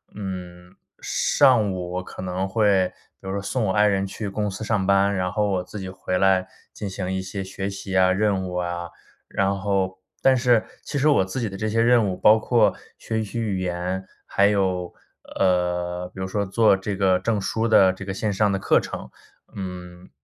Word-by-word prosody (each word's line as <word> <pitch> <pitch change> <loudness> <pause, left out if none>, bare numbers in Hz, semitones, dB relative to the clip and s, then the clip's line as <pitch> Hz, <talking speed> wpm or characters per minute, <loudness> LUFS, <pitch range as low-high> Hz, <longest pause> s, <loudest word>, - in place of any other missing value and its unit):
嗯， 90 -2 -7 0.3
上 120 -8 +3
午 90 -1 -5
我 90 - -2
可 - - -9
能 95 +1 -2
会 95 -2 +2 0.3
就 95 0 -5
是 100 - -2
送 110 +3 -1
我 95 - +1
爱 105 0 +4
人 100 -1 +1
去 100 +1 -5
公 105 +1 -2
司 100 +3 -6
上 105 -4 0
班， 100 +1 +3
然 90 -1 -1
后 105 -1 0
我 90 -2 0
自 105 +3 -8
己 95 -1 -6
回 90 -1 -3
来 95 -1 +3 0.3
进 105 - -5
行 95 -1 -4
一 95 0 -1
些 95 +1 -5
学 95 +1 -4
习 100 -1 -6
啊， 95 0 +5
任 95 -1 +1
务 90 - -6
啊。 85 -1 -3 0.4
然 100 0 0
后 95 -2 -1 0.2
但 130 -1 +5
是 120 -3 +3 0.2
其 145 - -4
实 150 +3 +3
我 95 -10 +4
自 120 +7 -4
己 110 - -1
的 95 - -7
这 110 +1 -2
些 115 +1 +1
任 120 -3 +4
务 90 - -2
包 110 +4 +5
括 110 -3 +3 0.2
学 110 0 -3
习 110 +2 -5
语 100 -4 -1
言， 90 +1 -3 0.2
还 100 0 +3
有， 95 -3 0 0.4
呃， 90 -1 0
比 95 - -6
如 95 - -2
说 100 +1 -1
做 100 0 +3
这 100 +1 -4
个 95 -2 +2
证 105 0 -1
书 110 +4 -1
的 95 -4 +6
这 95 +1 -8
个 95 - -4
线 105 +2 -1
上 105 +1 +2
的 100 - 0
课 - - +3
程， - - -7 0.4
嗯。 90 -2 -8
95 Hz, 220 characters per minute, -23 LUFS, 95-105 Hz, 0.4 s, 的